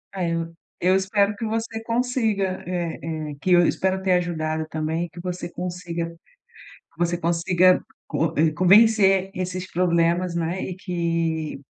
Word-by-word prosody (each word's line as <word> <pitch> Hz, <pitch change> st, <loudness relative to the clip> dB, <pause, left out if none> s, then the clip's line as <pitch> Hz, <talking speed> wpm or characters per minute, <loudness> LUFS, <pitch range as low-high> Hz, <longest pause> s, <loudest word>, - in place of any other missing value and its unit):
É, 175 Hz, -3 st, -1 dB
eu 165 Hz, 0 st, -3 dB, 0.3 s
eu 185 Hz, +2 st, +4 dB
espero 200 Hz, +2 st, +1 dB
que 225 Hz, -, -4 dB
você 225 Hz, 0 st, -3 dB
consiga 225 Hz, -5 st, 0 dB
eh 175 Hz, -2 st, -3 dB
eh, 155 Hz, -2 st, -4 dB
que 185 Hz, -, 0 dB
eu 175 Hz, -1 st, +6 dB
espero 190 Hz, 0 st, 0 dB
ter 190 Hz, -1 st, +2 dB
ajudado 160 Hz, -3 st, -1 dB
também 160 Hz, +2 st, -2 dB
e, -, -, -11 dB
que 175 Hz, -, -12 dB
você 180 Hz, 0 st, -5 dB
consiga 175 Hz, -2 st, -4 dB, 0.7 s
que -, -, -25 dB
você 175 Hz, 0 st, +1 dB
consiga 175 Hz, +2 st, +3 dB, 0.3 s
co 165 Hz, 0 st, -1 dB
eh, 155 Hz, +1 st, +4 dB
convencer 195 Hz, +2 st, +5 dB
esses 185 Hz, 0 st, -4 dB
problemas, 170 Hz, 0 st, +1 dB
né. 170 Hz, +2 st, -2 dB
E 185 Hz, -, -4 dB
que 165 Hz, -4 st, -2 dB
180 Hz, 155 wpm, -23 LUFS, 165-190 Hz, 0.7 s, eu